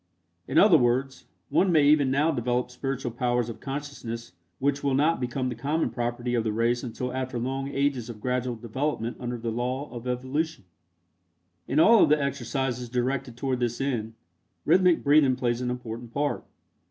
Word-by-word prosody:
In - - -1
other - - +7
words, 130 +3 0 0.2
one 190 -1 +3
may 155 -3 +5
even 145 -2 +5
now 145 +5 +2
develop 125 -2 -1
spiritual 135 -1 -3
powers 120 0 0
of 110 -1 -7
consciousness 135 -7 -6 0.3
which 140 +1 0
will 140 -2 +1
not 155 +4 +2
become 130 +1 -2
the 125 - -2
common 145 +8 -1
property 120 0 -2
of 115 -2 +1
the 110 - -1
race 115 +2 +1
until 125 0 -4
after 130 -1 -3
long 135 +3 -2
ages 140 -4 -1
of 115 -3 -8
gradual 125 +1 -1
development 120 +1 -3
under 120 -1 -4
the 115 0 -3
law 125 +5 -3
of 120 0 -7
evolution. 130 - -2 1.0
In 140 - +1
all 225 +6 +7
of - - +5
the 150 0 +4
exercises 130 -3 -2
directed 125 0 -2
toward 130 -1 -1
this 120 -1 -1
end, 115 -5 -2 0.5
rhythmic 180 -2 +4
breathing 140 -2 +5
plays 120 -1 -1
an 125 - -1
important 120 -1 -6
part. 145 +3 -1
125 Hz, 175 wpm, -26 LUFS, 120-140 Hz, 1.0 s, other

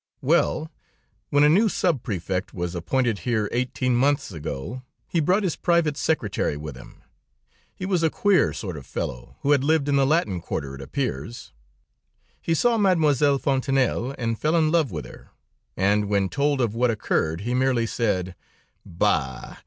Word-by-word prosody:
"Well, 160 +1 +1 0.6
when 145 0 +4
a - - +7
new 200 +9 +4
sub 170 - 0
prefect 95 -5 -3
was 90 -1 -3
appointed 115 +5 0
here 110 -4 0
eighteen 125 0 0
months 140 -1 +1
ago, 80 - -6 0.3
he 170 - 0
brought 185 +7 +2
his 180 -5 0
private 170 -4 +1
secretary 110 - -1
with 75 -2 -7
him. - - -14 0.7
He 185 - -5
was 185 -3 +1
a 165 - +3
queer 200 +3 +2
sort 90 -7 -5
of 65 - -10
fellow, - - -5
who 140 - +1
had 140 -2 +4
lived 155 -1 +2
in 140 -1 +2
the 135 -1 +3
Latin 120 - +1
Quarter, 70 -3 -4
it 70 - -9
appears. 70 - -4 0.9
He 165 - 0
saw 235 +6 +2
Mademoiselle 150 -7 +3
Fontanelle, 135 -1 0
and 115 -2 -2
fell 155 +2 +1
in 155 -2 +3
love 160 -5 +2
with 80 -6 -5
her, - - -13 0.5
and 100 +2 +2
when 100 -2 +1
told 140 -1 +1
of 115 -4 0
what 120 +2 +1
occurred, 85 -6 -1
he 120 +4 -2
merely 125 -2 +2
said: 95 -6 -1 0.5
'Bah! 65 -6 -1
130 Hz, 170 wpm, -24 LUFS, 95-155 Hz, 0.9 s, a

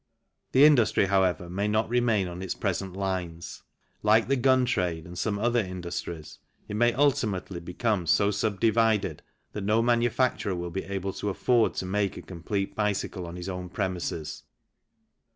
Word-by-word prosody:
The 135 +3 +7
industry, 125 -9 +4
however, 95 -2 +1
may 100 +4 -2
not 110 +1 +1
remain 115 -5 +1
on 90 +1 -7
its 95 -2 -3
present' 95 -2 -2
lines. 90 -4 -4 0.4
Like 110 +1 +4
the 135 - +2
gun 130 0 +3
trade 90 -9 -1
and 85 +1 -10
some 100 +3 -1
other 120 +3 +2
industries 85 -5 -5 0.3
it - - -6
may 120 +2 +4
ultimately 105 -10 0
become 90 +1 -1
so 100 +4 +3
sub 100 0 -1
divided 110 -7 +2 0.3
that 105 - -5
no 110 +3 +2
manu 120 0 +3
facturer 115 -6 0
will 85 0 -4
be 95 - -4
able 95 -1 -3
to 105 - -3
afford 115 +4 +2
to - - -3
make 100 +1 -1
a - - -8
complete 95 +3 -4
bicycle 100 -3 -2
on 85 - -7
his 90 +1 -6
own 90 -1 -5
premises. 90 -5 -3
100 Hz, 170 wpm, -27 LUFS, 90-115 Hz, 0.4 s, The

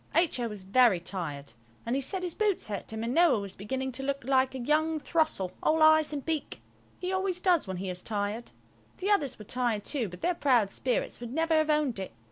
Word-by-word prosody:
H.O. 305 -8 +2
was 210 -3 -8
very 215 -1 +4
tired, 150 - -6 0.3
and 235 +2 0
he 275 - 0
said 365 +8 -2
his 355 -2 -2
boots 420 -2 0
hurt 205 -1 -5
him; 220 0 -4
and 235 +3 -2
Noël 335 -9 +5
was 200 -1 -7
beginning 265 +6 -3
to 255 - -3
look 275 0 -2
like 265 0 +2
a - - -2
young 310 +5 +1
throstle–all 310 - +1
eyes 315 -1 +6
and 285 -2 -4
beak. 320 -3 -3 0.4
He 365 0 -3
always 375 -1 0
does 355 - +2
when 190 -1 -4
he 190 +2 -4
is 180 -1 -5
tired. 210 +3 -3 0.5
The 390 +3 -1
others 285 -11 +1
were 210 - -11
tired 240 -3 -1
too, 250 -9 0
but 180 0 -11
their 360 - +1
proud 250 - +2
spirits 250 +3 -1
would 240 -1 -7
never 325 +3 +1
have 310 -1 +3
owned 300 -8 +1
it. 190 - -6
260 Hz, 220 wpm, -29 LUFS, 210-315 Hz, 0.5 s, eyes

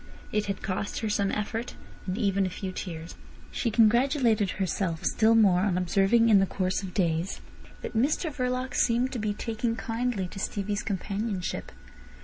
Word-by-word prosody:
It 210 -1 0
had 200 -1 -4
cost 195 0 -3
her 220 -2 -1
some 200 -1 +1
effort, 220 +3 -3 0.3
and 185 +2 -2
even 200 -4 +1
a - - -3
few 185 +1 -5
tears. 165 -3 -6 0.4
She 235 - -1
congratulated 230 -1 +3
herself 185 -3 -1
still 225 0 +4
more 200 -5 +5
on 185 -1 +1
observing 195 +6 +3
in 205 -3 +7
the 195 - +2
course 185 0 -1
of 190 -2 -8
days 170 -2 0 0.4
that - - -5
Mr 295 +6 +1
Verloc 255 -1 -2
seemed 245 +2 +2
to 245 - -3
be 210 -1 -1
taking 230 +2 -2
kindly 230 -4 -2
to 195 - -8
Stevie's 205 +1 -2
companionship. 200 -1 -3
210 Hz, 165 wpm, -28 LUFS, 190-230 Hz, 0.4 s, in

